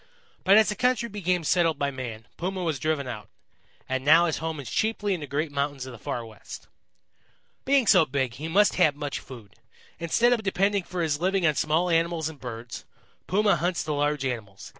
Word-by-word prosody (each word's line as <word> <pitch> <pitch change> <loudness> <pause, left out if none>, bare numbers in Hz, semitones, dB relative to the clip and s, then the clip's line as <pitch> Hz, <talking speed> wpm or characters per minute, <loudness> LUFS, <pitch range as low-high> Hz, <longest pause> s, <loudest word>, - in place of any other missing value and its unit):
But 195 +2 +6
as 220 - +5
the 210 - -1
country 250 -1 +1
became 180 -4 -1
settled 165 -1 +2
by 140 -1 -1
man, 120 -4 -7
Puma 185 +1 -3
was 160 -5 -1
driven 155 -2 -1
out, 105 -4 -7 0.6
and 130 0 -2
now 160 +4 +6
his 160 - -1
home 160 -1 -4
is 135 - -7
chiefly 215 -2 0
in 180 - -3
the 145 - -7
great 145 +2 -2
mountains 140 -2 -2
of 130 - -8
the 120 - -11
Far 120 +2 -4
West. 110 -3 -11 1.0
"Being 275 -2 +3
so 185 -6 +5
big, 130 -3 -1
he 150 +6 -6
must 200 +5 +3
have 155 -6 +4
much 145 -1 -4
food. 115 -6 -13 0.4
Instead 230 +9 +3
of 235 - 0
depending 195 0 +1
for 180 -2 -3
his 150 -1 -1
living 190 0 +1
on 155 - +4
small 155 +4 +1
animals 165 -1 +1
and 155 -3 -12
birds, 115 -1 -7 0.4
Puma 200 0 +3
hunts 175 +1 -1
the 155 - -2
large 145 -1 0
animals. 110 -6 -5
160 Hz, 205 wpm, -26 LUFS, 135-185 Hz, 1.0 s, But